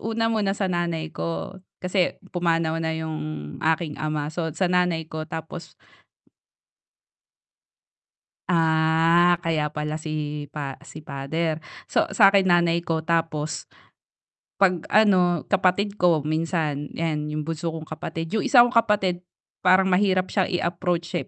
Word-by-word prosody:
Una 225 0 -1
muna 200 -2 0
sa 200 - -1
nanay 170 -2 -2
ko 85 - -5 0.2
kasi 180 0 0 0.2
pumanaw 165 -2 0
na 160 0 -1
yung 160 -1 -4 0.4
aking 160 -1 0
ama, 155 -1 -2
so 165 0 -2
sa 190 - +1
nanay 180 -2 +1
ko 155 0 -5
tapos 160 +1 -7 2.8
Ah, 165 +1 +3
kaya 155 -2 0
pala 150 +1 -4
si 150 -1 -4
pa 140 -3 -5
si 155 0 -11
father. 155 +3 -2 0.3
So - - +2
sa'kin 195 -3 +5
nanay 170 -1 +3
ko 165 -1 -2
tapos 160 -2 -1 0.9
'pag 185 -4 +2
ano, 185 -6 +4
kapatid 195 +1 +1
ko 165 -5 +3
minsan 155 -2 -1
'yan 155 -2 -2
yung 150 0 -3
bunso 165 0 -3
kong 160 -1 -7
kapatid, 165 +1 -5
yung 220 - +1
isa 245 -3 +7
kong 245 - -3
kapatid 205 -6 +2 0.4
parang 190 +1 +4
mahirap 185 0 +2
siyang 190 -3 +1
i-approach 175 0 -1
siya, 175 - -3
165 Hz, 135 wpm, -24 LUFS, 155-180 Hz, 2.8 s, isa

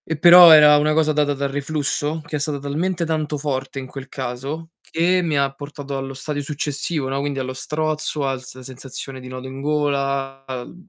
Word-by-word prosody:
E 160 - -2
però 175 +2 +9
era 150 -1 +8
una 150 +1 +2
cosa 155 0 +2
data 145 -1 +1
dal 140 0 -2
reflusso, 145 +2 -2
che 155 -2 -3
è - - -4
stata 145 0 -2
talmente 165 +5 -2
tanto 155 -2 -2
forte 135 -2 -3
in 130 - -6
quel 135 +1 -9
caso 135 +5 -5
che 180 +3 +1
mi 155 -4 0
ha 140 -1 +1
portato 145 0 -7
allo 135 0 -5
stadio 145 +2 -4
successivo, 145 0 -3
no, 135 +1 -2
quindi 140 0 -3
allo 130 0 -3
strozzo, 155 +1 -2
al 135 -1 -2
s 130 - -12
la 130 - -11
sensazione 130 +1 -8
di 130 - -10
nodo 130 0 -7
in 135 +1 -8
gola, 140 -2 -1
al 130 +3 -6
145 Hz, 205 wpm, -21 LUFS, 135-155 Hz, -, però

